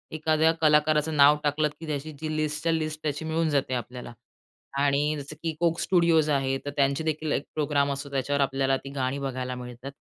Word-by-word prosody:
एखाद्या 155 +1 +3
कलाकाराचं 150 0 +3
नाव 145 +1 +7
टाकलत 150 +1 +1
की 165 - -8
त्याची 150 +1 -4
जी 155 0 -3
लिस्टच्या 155 +2 -1
लिस्ट 155 -1 -2
त्याची 150 +1 -2
मिळून 160 0 0
जाते 140 -3 0
आपल्याला. 125 0 -6 0.7
आणि 145 +2 +2
जसं 145 +2 -8
की 160 -2 -2
Coke 170 0 +2
Studios 170 -4 +3
आहे, 135 -1 +1
तर - - -2
त्यांचे 140 +2 +2
देखील 155 -1 -2
एक 140 - -1
प्रोग्राम 145 -2 +1
असतो 140 +1 -6
त्याच्यावर 140 +1 0
आपल्याला 135 0 +1
ती 135 - -10
गाणी 130 +1 -1
बघायला 130 -2 -3
मिळतात. 125 +2 -8
145 Hz, 185 wpm, -26 LUFS, 135-155 Hz, 0.7 s, नाव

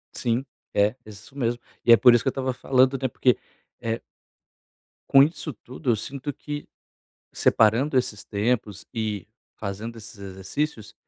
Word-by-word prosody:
Sim, 120 +2 0 0.3
é. 105 +3 +3
É - - -11
isso 105 +7 -13
mesmo, 120 -2 0 0.3
e 120 - +6
é 115 - +10
por 125 - +7
isso 120 - +4
que - - -4
eu - - -3
tava 130 -1 -2
falando 130 +1 +3
até 130 -1 0
porque 125 0 +2 0.4
eh 115 0 -2 1.1
Com 135 - +8
isso 155 0 -2
tudo 130 +5 -6
eu - - +3
sinto 140 +6 -5
que 145 +1 -6 0.7
separando 120 +6 +3
esses 105 -4 -3
tempos 105 -1 -1
e 110 -4 -3 0.3
fazendo 110 +3 -5
esses 105 0 -12
exercícios, 100 +6 -4
120 Hz, 155 wpm, -25 LUFS, 105-135 Hz, 1.1 s, é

